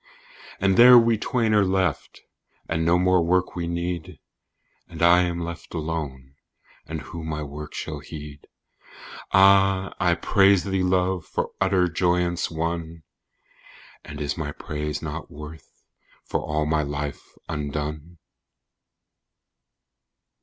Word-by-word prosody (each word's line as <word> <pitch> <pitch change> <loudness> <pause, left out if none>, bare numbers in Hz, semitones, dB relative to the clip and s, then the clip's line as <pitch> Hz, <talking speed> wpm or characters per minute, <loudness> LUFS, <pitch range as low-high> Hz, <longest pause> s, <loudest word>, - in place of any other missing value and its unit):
And 95 -1 +2
there 125 +1 +10
we 115 -1 +4
twain 115 -2 0
are 105 -1 +5
left, 95 -4 -1 0.5
and 80 0 -1
no 85 +2 +3
more 90 0 +3
work 90 +2 +1
we 85 -1 -3
need: 85 0 -4 0.7
"And - - -11
I 85 +1 +6
am 85 -1 -1
left 85 +1 -7
alone, 75 -5 -5 0.5
and 80 -1 -5
who 85 -2 -8
my 75 -1 -4
work 75 +1 -8
shall 75 -2 -5
heed?" 75 0 -10 0.8
Ah! 95 0 +4
I 90 -2 +3
praise 100 0 +3
thee, 95 -1 -1
Love, 90 -1 +1
for - - -3
utter 95 -2 +3
joyance 85 0 0
won! 80 0 -4 1.0
"And - - -9
is 70 -1 -2
my 75 -2 -3
praise 75 0 -5
nought 80 +1 -6
worth 75 +2 -11 0.5
for - - -2
all 75 0 -2
my 75 0 +1
life 70 0 -4 0.2
undone?" 75 +3 -5
85 Hz, 125 wpm, -24 LUFS, 75-95 Hz, 1.0 s, there